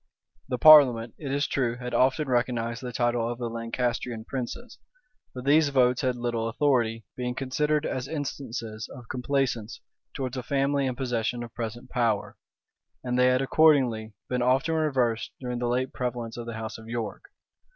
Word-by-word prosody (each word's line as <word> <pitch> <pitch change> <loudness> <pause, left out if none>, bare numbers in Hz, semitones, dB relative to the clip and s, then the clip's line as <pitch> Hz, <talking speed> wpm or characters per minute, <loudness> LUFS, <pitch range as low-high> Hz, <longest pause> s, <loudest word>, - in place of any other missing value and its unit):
The 125 - -1
parliament, 125 -7 +7
it 140 -4 -4
is 140 +1 +1
true, 120 -3 0
had 125 -1 -6
often 135 +3 +2
recognized 120 -2 0
the 125 -1 -5
title 120 -1 0
of 120 - -5
the 120 -1 -4
Lancastrian 115 0 -3
princes; 135 - -6 0.6
but 125 0 -7
these 150 +1 +5
votes 125 -2 +3
had 130 -2 0
little 120 -2 -2
authority, 115 -4 +1
being 125 -1 -3
considered 150 +3 0
as 130 0 -3
instances 120 -7 -5
of 120 -2 -11
complaisance 125 -3 -1 0.4
towards 130 -2 -3
a - - -2
family 140 +1 0
in 130 - -2
possession 120 -2 -2
of 120 - -10
present 120 +2 -6
power; 115 -4 0 0.7
and 125 -1 -2
they 125 - +5
had 125 +1 +3
accordingly 130 -8 +3
been 125 -1 -1
often 130 +6 +2
reversed 130 -8 +1
during 125 -2 -4
the 120 - -1
late 125 +2 -1
prevalence 120 -2 -3
of 120 -1 -7
the 115 - -5
house 110 0 -6
of 110 - -12
York. 115 -2 -4
125 Hz, 170 wpm, -27 LUFS, 115-135 Hz, 0.7 s, parliament